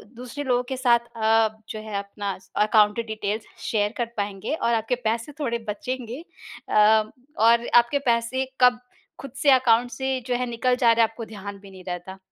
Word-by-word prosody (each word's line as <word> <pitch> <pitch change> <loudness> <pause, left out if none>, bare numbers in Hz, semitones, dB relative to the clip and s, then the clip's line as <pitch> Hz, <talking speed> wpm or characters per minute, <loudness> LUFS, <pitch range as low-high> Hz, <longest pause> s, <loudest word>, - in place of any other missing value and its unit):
दूसरे 250 +4 -7
लोगों 250 -2 +1
के - - -4
साथ 245 -2 +4 0.2
अ, - - -9
आप 220 0 +2
जो 215 - -5
है 215 -2 -5
अपना 200 0 -5 0.3
अकाउंट 210 0 +3
डिटेल्स 215 -1 -3 0.2
शेयर 210 -2 +1
कर 240 - 0
पाएँगे 205 +3 -3
और 235 -6 0
आपके 225 +2 0
पैसे 230 +5 -3
थोड़े 235 -5 -1
बचेंगे 250 +4 -5 0.5
अ, - - -4 0.6
और 235 +2 +4
आपके 240 +4 +5
पैसे 235 +3 0 0.2
कब 250 -1 +5 0.4
ख़ुद 275 - -8
से 285 - +2
अकाउंट 245 -2 +4
से 265 +2 -2
जो 250 - 0
है 250 - -1
निकल 240 +2 +1
जा 240 -2 +4
रहा 230 0 +4
हैं, 225 - +2
आपको 225 0 -8
ध्यान 200 -2 -8
भी 195 0 -14
नहीं 185 -1 -13
रहता। 180 +1 -6
230 Hz, 190 wpm, -24 LUFS, 210-250 Hz, 0.6 s, आपके